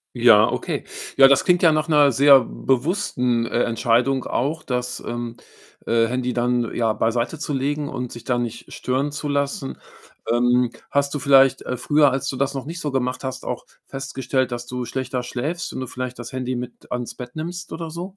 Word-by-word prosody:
Ja, 115 -3 +6
okay. - - -3 0.3
Ja, 135 -1 +9
das 135 -1 +4
klingt 180 -1 +3
ja 165 - +7
nach 155 0 +1
'ner 150 -3 +5
sehr 140 +2 +7
bewussten, 125 - 0
äh, 120 - 0
Entscheidung 120 +3 +1
auch, 150 +6 -2
das, 125 -1 -2
ähm, 120 0 -4 0.5
äh, 115 0 +3
Handy 125 +1 -1
dann, 120 -1 0
ja, 115 -2 +1
beiseitezulegen 140 +5 -1
und 125 -3 -5
sich 120 0 -10
da 125 -1 0
nicht 120 -1 -5
stören 135 +3 -1
zu 145 0 -4
lassen. 140 -1 -2 0.5
Ähm, 125 0 +3 0.2
hast 140 0 +1
du 145 - -2
vielleicht, 135 0 +5
äh, 125 - -3
früher, 145 +3 +3
als 135 +1 -2
du 135 - -3
das 140 +1 0
noch 135 0 -5
nicht 170 +2 -6
so 150 - -2
gemacht 130 -1 -2
hast, 130 -1 -5
auch - - -4 0.2
festgestellt, 135 -1 -2
dass 120 0 -5
du 125 0 -4
schlechter 125 +1 -3
schläfst 145 +8 -4
und - - -5
du 130 - -4
vielleicht 125 0 -5
das 120 -1 -8
Handy 130 -1 -3
mit 125 0 -8
ans 125 -1 -4
Bett 125 +1 -9
nimmst 175 +2 -5
oder 165 -1 -5
so? 180 +4 -7
130 Hz, 190 wpm, -22 LUFS, 120-140 Hz, 0.5 s, Ja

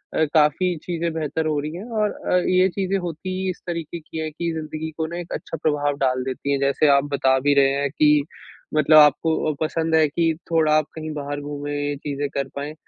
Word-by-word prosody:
अ, 160 - +3
काफ़ी 160 +4 +3
चीज़े 170 -1 -2
बेहतर 160 0 -2
हो 150 -2 0
रही 150 +1 -4
है 190 +6 -7
और 215 -3 0
अ, 180 - -1
ये 185 0 +4
चीज़े 195 +1 -1
होती 170 +2 -5
ही 190 - -1
इस 180 - -5
तरीके 170 -1 -4
की 155 +1 -10
है 155 - -2
कि 170 +2 -3
ज़िंदगी 160 0 -5
को 160 - -1
ना 170 - -6
एक 175 - -7
अच्छा 165 - -5
प्रभाव 145 -2 +1
डाल 130 -2 0
देती 135 +2 -3
हैं। 140 - +1
जैसे 140 +2 +2
आप 140 -1 +5
बता 130 -1 +3
भी 145 +2 +2
रहे 135 -1 +5
हैं 140 - 0
कि 150 -1 +4 0.5
मतलब 155 +1 +5
आपको 150 +2 +5 0.2
अ, - - -6
पसंद 160 +1 0
है 155 -1 +5
कि 165 +2 +1 0.2
थोड़ा 155 -2 +3
आप 155 - +1
कहीं 155 0 -5
बाहर 145 0 -4
घूमे, 145 0 -5 0.2
ये 145 - -2
चीज़े 145 0 -3
कर 140 -1 -2
पाएँ, 145 +2 -4
155 Hz, 230 wpm, -22 LUFS, 145-165 Hz, 0.5 s, आप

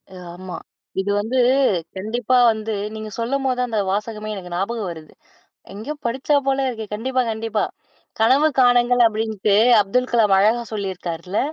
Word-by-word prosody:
ஆமா. 180 0 -8 0.4
இது 195 +1 -1
வந்து 225 +5 -2 0.6
கண்டிப்பா 235 +5 0
வந்து 220 0 -4 0.2
நீங்க 215 0 -6
சொல்லும்போது, 255 +1 -1
அந்த 220 -3 -1
வாசகமே 210 +1 -3
எனக்கு 180 -3 -8
ஞாபகம் 200 +1 -2
வருது. 160 -2 -11 0.6
எங்கியோ 220 +9 -5
படிச்சா 265 +5 +1
போல 270 0 +1
இருக்கு. 225 -3 -5
கண்டிப்பா, 255 +4 -1
கண்டிப்பா. 220 0 -1 0.6
"கனவு 275 +7 +4
காணுங்கள்" 245 0 +4
அப்படின்னுட்டு 215 -2 0 0.3
அப்துல் 250 +6 -1
கலாம் 210 -4 +4
அழகா 220 +4 +3
சொல்லியிருக்கார்ல. 185 -2 -4
220 Hz, 130 wpm, -21 LUFS, 200-245 Hz, 0.6 s, கனவு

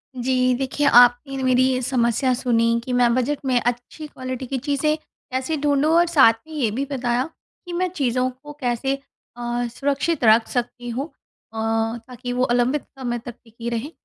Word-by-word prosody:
जी, 255 0 +1
देखिए, 270 +2 0
आपने 245 +2 +5
न 265 - -3
मेरी 255 0 +4
ये 255 -1 0
समस्या 245 +1 +1
सुनी 230 -2 +1
कि 250 - -3
मैं 245 -1 +4
बजट 260 +3 0
में 250 -2 +3
अच्छी 245 +6 -4
क्वालिटी 255 -2 -6
की 270 - -2
चीज़ें 285 +3 0
कैसे 265 0 -5
ढूँढूँ, 290 +1 +2
और 345 +1 +5
साथ 270 -9 +6
में 315 - -11
ये 265 -8 0
भी 270 +5 -2
बताया 245 -2 0 0.4
कि, 350 - -7
मैं 365 +1 0
चीज़ों 255 -6 0
को 270 +4 -12
कैसे 250 +2 0 0.4
अ, 240 0 -2
सुरक्षित 280 +4 -1
रख 225 +1 +5
सकती 245 0 -3
हूँ 255 +5 -3
अ, - - -29 1.0
ताकि 245 0 -6
वो 250 +1 +1
अलंबित 245 +4 +1 0.2
समय 240 -2 -2
तक 240 - -7
टिकी 230 +1 -7
रहें। 235 +6 -3
255 Hz, 180 wpm, -22 LUFS, 240-280 Hz, 1.0 s, साथ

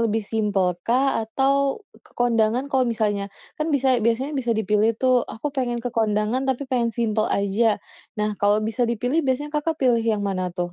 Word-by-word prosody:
lebih 225 -2 0
simpel 195 -5 0
kah, 255 +3 +1
atau 275 - 0 0.2
ke - - -24
kondangan 235 +1 +2
kalau 255 -2 +2
misalnya 205 -3 -1 0.3
kan 310 - 0
bisa 265 -4 +2
biasanya 235 +6 0
bisa 240 -5 -1
dipilih 215 +1 +1
tuh, 255 -1 +3
"aku 275 +6 -5
pengen 250 -3 -1
ke 245 - -3
kondangan 220 +4 0
tapi 265 +2 -1
pengen 250 -3 0
simpel 220 -1 0
aja". 205 +2 +1 0.4
Nah 210 0 0
kalau 205 +1 +3
bisa 225 +2 0
dipilih, 245 +7 0
biasanya 280 +1 -2
Kakak 305 +1 -1
pilih 245 -5 +2
yang 220 -3 0
mana 185 -2 -1
tuh? 175 0 -3
230 Hz, 180 wpm, -23 LUFS, 215-260 Hz, 0.4 s, tuh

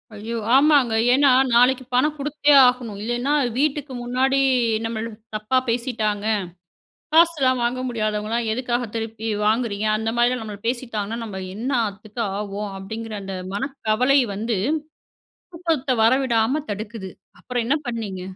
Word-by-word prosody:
ஐயோ! 220 +3 -5 0.2
ஆமாங்க. 280 -4 +4 0.2
ஏன்னா 280 +1 +5 0.2
நாளைக்கி 250 +2 +4
பணம் 295 +5 +3
குடுத்தே 295 +1 +1 0.2
ஆகணும். 240 -5 -2
இல்லேன்னா, 240 +5 -1 0.2
வீட்டுக்கு 285 -1 -1
முன்னாடி 260 +3 +1 0.5
நம்மள 225 0 -3 0.3
தப்பா 215 +5 0
பேசிட்டாங்க. 225 -4 -1 0.9
காசுலாம் 310 -6 +4
வாங்க 245 +2 -1
முடியாதவங்கலாம், 215 0 -2
எதுக்காக 245 +1 -1
திருப்பி 225 0 -4 0.2
வாங்குறீங்க? 215 -1 0
அந்தமாரிலாம் 240 +3 0
நம்மள 210 -2 -8
பேசிட்டாங்கன்னா, 230 -3 -3
நம்ம 190 -3 -6
என்னாத்துக்கு 220 -2 -2 0.2
ஆவோம். 205 0 -4
அப்பிடிங்கிற 220 +3 -6
அந்த 195 0 -5 0.2
மனக்கவலை 255 +2 +1
வந்து 220 +2 -2 1.0
தூக்கத்த 325 -6 -2
வரவிடாம 255 +3 +2
தடுக்குது. 205 -1 -6 0.3
அப்புறம் 245 -2 -3
என்ன 280 +5 +2
பண்ணீங்க? 210 -6 -4
235 Hz, 115 wpm, -22 LUFS, 215-260 Hz, 1.0 s, ஏன்னா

